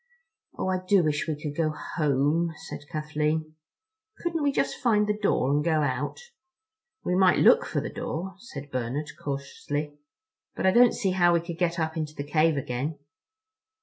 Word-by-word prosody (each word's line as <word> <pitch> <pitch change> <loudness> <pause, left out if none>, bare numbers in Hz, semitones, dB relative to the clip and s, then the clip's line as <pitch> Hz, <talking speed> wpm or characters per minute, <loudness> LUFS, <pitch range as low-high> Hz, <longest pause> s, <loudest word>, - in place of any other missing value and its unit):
"Oh, - - -2
I 185 0 +1
do 190 -1 +4
wish 150 0 0
we 155 -2 -2
could 150 -1 -5
go 160 -1 +1
home," 155 +1 0
said 145 - -9
Kathleen. 155 0 -1 0.6
"Couldn't 335 -2 -2
we 285 -1 +2
just - - 0
find 215 -5 +3
the 210 0 0
door 200 -10 +1
and 145 +1 +2
go 160 -2 +2
out?" 135 +1 -2 0.8
"We 180 - 0
might 185 0 +5
look 485 +1 +5
for - - -1
the - - -4
door," 185 +4 -4
said 145 -10 -9
Bernard 130 +4 -3
cautiously, 145 +1 -4 0.6
"but - - -2
I 190 - +6
don't 240 +3 +6
see 195 -4 0
how 175 -2 +4
we - - +4
could 170 0 -7
get 170 -1 +1
up 160 0 -1
into 155 -1 -3
the 140 - -4
cave 155 +1 +2
again." 140 +3 -3
155 Hz, 180 wpm, -27 LUFS, 145-185 Hz, 0.8 s, I